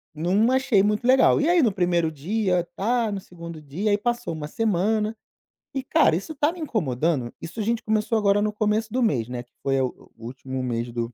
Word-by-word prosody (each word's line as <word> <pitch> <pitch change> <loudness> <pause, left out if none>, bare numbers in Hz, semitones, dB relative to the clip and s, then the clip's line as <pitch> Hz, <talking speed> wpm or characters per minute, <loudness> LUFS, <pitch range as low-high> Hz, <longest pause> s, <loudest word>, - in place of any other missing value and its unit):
não 190 +9 +2
achei 260 -7 +3
muito 210 +3 0
legal. 260 +1 +5
E 305 - +2
aí 350 -2 +5
no 230 - +3
primeiro 175 -3 +1
dia, 180 +4 0
tá, 230 +1 0
no 200 - -3
segundo 170 -3 -10
dia, 170 +9 -2
aí 205 - +3
passou 240 -3 -2
uma 155 -2 -5
semana. 215 +3 0 0.6
E, 270 - -2
cara, 160 - +3
isso 245 - -5
tá 295 +3 +2
me 360 - -11
incomodando. 155 - -1
Isso 170 +7 -7
a - - 0
gente 230 +2 -1
começou 220 +1 +1
agora 205 -1 +3
no 210 0 0
começo 215 +1 0
do 255 - +1
mês, 125 - +1
né, 125 -1 -5
que 120 - -36
foi 135 -1 +1
o 130 - -5
o 115 - -11
último 130 +1 -5
mês 120 -1 -2
do 120 0 -4
200 Hz, 215 wpm, -24 LUFS, 150-225 Hz, 0.6 s, legal